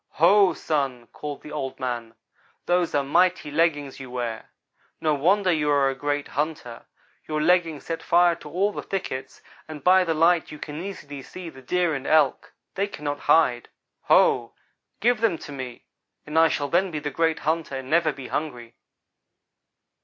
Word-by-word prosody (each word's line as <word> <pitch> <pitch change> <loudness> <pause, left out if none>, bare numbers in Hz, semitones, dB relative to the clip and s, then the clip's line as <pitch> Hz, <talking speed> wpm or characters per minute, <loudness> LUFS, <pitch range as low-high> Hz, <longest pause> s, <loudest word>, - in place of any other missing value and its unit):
"'Ho, 195 +4 +5
Sun!' 135 -6 -2
called 145 -1 -7
Old 145 -4 -5
man, 120 -3 -4 0.5
'those 175 -2 +1
are 140 - +2
mighty 170 +2 +2
leggings 145 -4 0
you 130 -1 -8
wear. 120 -3 -4 0.5
No 155 -1 +1
wonder 185 +6 +2
you 150 -3 +1
are 140 -2 +3
a - - -4
great 145 +1 -2
hunter. 145 -5 -4 0.4
Your 155 -1 -1
leggings 165 -2 +2
set 165 -1 -4
fire 175 0 +4
to 150 - -11
all 190 +6 +1
the - - -5
thickets, 130 -9 -5 0.2
and 155 -2 -9
by 185 +1 +6
the 165 -2 -1
light 165 +1 +3
you 150 - -8
can 150 +2 -7
easily 145 -8 -7
see 175 +5 -9
the 135 -2 -14
Deer 175 +5 0
and 135 -2 -4
Elk; 155 - +2 0.2
they 200 +1 -1
cannot 145 -6 -5
hide. 125 -7 +3 0.4
Ho! - - +4 0.5
Give 235 0 +2
them 215 -8 +2
to 145 - -10
me 130 -3 -7 0.4
and 150 - -7
I 165 - +7
shall 145 -2 -2
then 185 +3 +2
be 160 - -5
the 145 0 -4
great 160 +2 +1
hunter 160 -2 -1
and 130 -1 -6
never 165 0 +3
be 135 -2 -9
hungry.' 125 -6 -4
150 Hz, 175 wpm, -24 LUFS, 135-170 Hz, 0.5 s, I